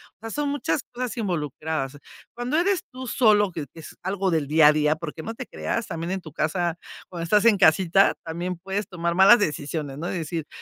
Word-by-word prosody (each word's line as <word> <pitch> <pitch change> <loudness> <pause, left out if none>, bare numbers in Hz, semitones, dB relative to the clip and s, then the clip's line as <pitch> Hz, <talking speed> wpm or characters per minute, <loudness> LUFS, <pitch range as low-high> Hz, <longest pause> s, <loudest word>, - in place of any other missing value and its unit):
O - - -112
sea, 225 +1 -7
son 295 +2 -1
muchas 285 0 -1
cosas 245 -2 -4
involucradas. 155 - -3 0.4
Cuando 245 +5 -1
eres 370 +2 +2
tú 260 0 -8
solo, 210 -4 +3
que 165 - -5
es 160 -1 -10
es - - -18
algo 190 0 -1
del 155 -4 0
día 155 +1 +6
a - - +4
día, 150 0 +2
porque 160 0 -7
no 225 +7 -6
te 255 - -6
creas 230 -1 -3
también 170 -2 -5
en 190 0 -2
tu 155 - -11
casa, 165 +2 -1 0.3
cuando 170 -2 -6
estás 210 +5 +3
en 225 -3 +6
casita, 185 +2 +4
también 175 +2 -4
puedes 195 +4 -4
tomar 170 -1 -2
malas 190 +6 +7
decisiones, 150 - -3
¿no? 170 - -3
y - - -3
decir: 160 -2 -4
180 Hz, 215 wpm, -24 LUFS, 160-215 Hz, 0.4 s, malas